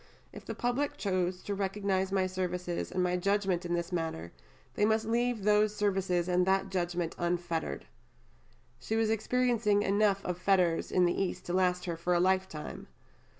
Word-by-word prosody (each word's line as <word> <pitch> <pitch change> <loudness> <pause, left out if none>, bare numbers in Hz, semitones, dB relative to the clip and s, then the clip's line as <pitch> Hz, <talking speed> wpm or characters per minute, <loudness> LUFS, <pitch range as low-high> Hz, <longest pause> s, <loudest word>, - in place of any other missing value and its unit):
If - - -10
the - - -5
public 280 +4 -1
choose 185 -4 -1
to 205 - -3
recognize 195 -1 -1
my 190 -1 +2
services 180 -1 -3
and 185 - 0
my 180 0 +1
judgment 190 -2 0
in 175 - 0
this 170 +1 -3
manner, 160 - -3 0.4
they - - 0
must 220 +1 +2
leave 235 -1 0
those 210 0 +3
services 190 -4 0
and 180 0 +2
that 195 0 +2
judgment 175 -2 -1
unfettered." 175 - -2 0.9
She 220 - -3
was 225 -1 +2
experiencing 225 -2 +1
enough 200 0 +2
of 180 -1 -3
fetters 180 -3 +2
in 180 -1 +4
the 175 - +1
East 185 -1 -3
to 175 - -3
last 180 -1 +1
her 170 -2 -3
for 175 +2 0
a - - +3
lifetime. 185 -4 -1
185 Hz, 170 wpm, -31 LUFS, 175-205 Hz, 0.9 s, in